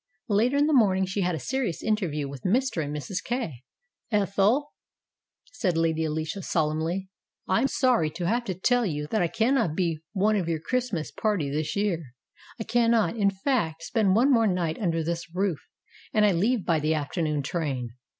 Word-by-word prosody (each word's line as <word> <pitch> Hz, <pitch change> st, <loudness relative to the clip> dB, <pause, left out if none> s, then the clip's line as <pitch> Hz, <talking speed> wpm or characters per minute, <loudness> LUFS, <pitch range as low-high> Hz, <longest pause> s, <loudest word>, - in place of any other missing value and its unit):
Later 230 Hz, +7 st, +2 dB
in 290 Hz, -, +4 dB
the 310 Hz, -, +2 dB
morning 190 Hz, -7 st, +4 dB
she 190 Hz, +2 st, -2 dB
had 180 Hz, -2 st, 0 dB
a -, -, -4 dB
serious 245 Hz, -, -2 dB
interview 175 Hz, -10 st, -1 dB
with 135 Hz, -2 st, -8 dB
Mr. 230 Hz, -, +1 dB
and 145 Hz, -, -5 dB
Mrs. 165 Hz, +6 st, -4 dB
Kay. 235 Hz, -, -3 dB, 0.5 s
"Ethel," 210 Hz, +7 st, +2 dB, 0.8 s
said 185 Hz, -9 st, 0 dB
Lady 160 Hz, -1 st, +1 dB
Alicia 155 Hz, +5 st, -3 dB
solemnly, 165 Hz, +4 st, -1 dB, 0.4 s
"I 190 Hz, +5 st, +2 dB
am 270 Hz, -, +3 dB
sorry 250 Hz, -, +2 dB
to 170 Hz, +3 st, -5 dB
have 235 Hz, +7 st, +1 dB
to 190 Hz, -5 st, -3 dB
tell 245 Hz, +7 st, +2 dB
you 150 Hz, -7 st, -2 dB
that 220 Hz, -, +1 dB
I 175 Hz, -, +2 dB
cannot 225 Hz, -, +1 dB
be 165 Hz, -3 st, 0 dB
one 210 Hz, +2 st, +2 dB
of 180 Hz, -5 st, -1 dB
your 160 Hz, -1 st, 0 dB
Christ 250 Hz, +8 st, -1 dB
mas 160 Hz, -6 st, -3 dB
party 200 Hz, -11 st, -1 dB
this 150 Hz, +1 st, -2 dB
year. 170 Hz, -11 st, -2 dB, 0.4 s
I -, -, -2 dB
cannot, 230 Hz, -1 st, +2 dB
in 205 Hz, -3 st, +3 dB
fact, 190 Hz, -, -1 dB
spend 200 Hz, -1 st, +2 dB
one 255 Hz, +6 st, +4 dB
more 230 Hz, -2 st, +4 dB
night 175 Hz, -4 st, -1 dB
under 165 Hz, -6 st, 0 dB
this 170 Hz, +1 st, -4 dB
roof, 185 Hz, -5 st, 0 dB, 0.5 s
and 215 Hz, -1 st, +4 dB
I 205 Hz, -, +5 dB
leave 210 Hz, +5 st, +1 dB
by 165 Hz, -3 st, +2 dB
the 155 Hz, +1 st, +1 dB
after 150 Hz, +3 st, -3 dB
noon 150 Hz, -3 st, 0 dB
train. 135 Hz, -6 st, -3 dB
185 Hz, 190 wpm, -26 LUFS, 160-225 Hz, 0.8 s, I